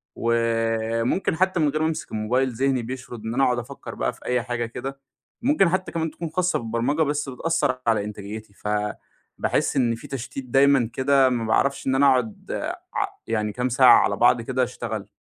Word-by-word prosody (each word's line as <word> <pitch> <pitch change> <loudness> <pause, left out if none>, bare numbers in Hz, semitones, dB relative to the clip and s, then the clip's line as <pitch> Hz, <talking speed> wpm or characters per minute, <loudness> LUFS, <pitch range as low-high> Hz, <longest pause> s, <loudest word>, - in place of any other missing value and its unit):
وممكن 115 +5 0
حتّى 185 0 +1
من 150 -2 +3
غير 155 +2 -1
ما 160 - +2
امسك 160 - -4
الموبايل، 125 +5 0
ذهني 130 +1 +1
بيشرد 120 -2 -7
إن 115 - -3
أنا 135 +2 +2
أقعد 125 -1 +2
أفكّر 120 - -8
بقى - - -1
في - - -18
أي 125 -1 0
حاجة 120 -1 -2
كده. 135 +4 -6 0.4
ممكن 245 - +3
حتّى 185 +1 -1
كمان 160 -1 -2
تكون 170 -2 -6
خاصة 180 +2 0
بالبرمجة 115 +7 -1
بس 145 -1 -1
بتأثر 135 -1 -1
على 110 -3 +3
إنتاجيتي، 105 0 -7
فباحس 105 0 -3
إن 120 -3 +2
في - - -11
تشتيت 135 0 -6
دايمًا 135 -2 +4
كده 135 0 +4
ما 120 -2 -1
باعرفش 140 +5 +1
إن 130 - +2
أنا 140 +1 +4
أقعد 125 -5 0
آآ، - - -3
ع - - 0 0.2
يعني 105 -2 -1
كام 125 +2 -1
ساعة 125 +1 +7
على 100 - +1
بعض 120 0 +4
كده 130 +2 0
أشتغل. 110 -4 -4
125 Hz, 190 wpm, -24 LUFS, 115-140 Hz, 0.4 s, ساعة